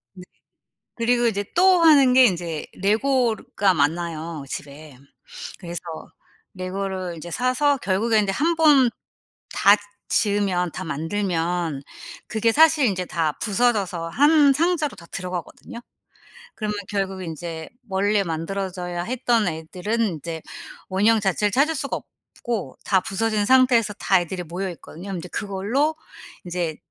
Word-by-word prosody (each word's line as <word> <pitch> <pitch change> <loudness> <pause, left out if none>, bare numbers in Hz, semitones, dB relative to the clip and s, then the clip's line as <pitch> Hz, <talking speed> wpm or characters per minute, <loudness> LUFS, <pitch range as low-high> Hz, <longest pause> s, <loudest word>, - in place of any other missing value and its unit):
네. 180 - -11 0.7
그리고 240 +1 +1
이제 205 -3 0
또 365 0 +5
하는 280 -6 +6
게 260 0 +8
인제 170 -6 -2
레고 230 +4 +2
르가 195 -2 0
많아요 160 0 -2
집에. 145 0 -8 0.6
그래서 175 -2 -6 0.7
레고를 185 -1 -4
이제 165 +2 -8
사서 255 - +1
결국에 215 +3 +1
인제 200 -2 +1
1 330 - +1
번 285 -6 +5 0.6
다 200 - +6 0.4
지으면 200 -4 +1
다 185 - -6
만들면 165 -1 -2 0.5
그게 225 0 +1
사실 310 0 +5
인제 185 -4 -1
다 160 -2 0
부서져서 200 -6 0
1 290 - +5
상자로 315 0 0
다 170 - -13
들어가거든요. 180 +5 -6 0.7
그러면 210 -1 -3
결국은 195 -2 -3
인제 160 0 -6 0.2
원래 200 +1 +1
만들어져야 180 +1 -4
했던 235 -2 +1
애들은 180 +7 -3
인제 165 -6 -2 0.5
원형 210 +4 +3
자체를 205 +1 +1
찾을 290 +7 +2
수가 275 0 -2 0.4
없고 225 - -4
다 190 -2 +3
부서진 215 +2 -1
상태에서 250 -4 +4
다 190 -2 +2
애들이 180 +1 -5
모여 180 +4 -4
있거든요. 170 +2 -12
그럼 190 - -3
인제 180 - -8
그걸로 220 +11 -1 0.5
인제 175 -3 -3
195 Hz, 280 characters per minute, -23 LUFS, 175-235 Hz, 0.7 s, 게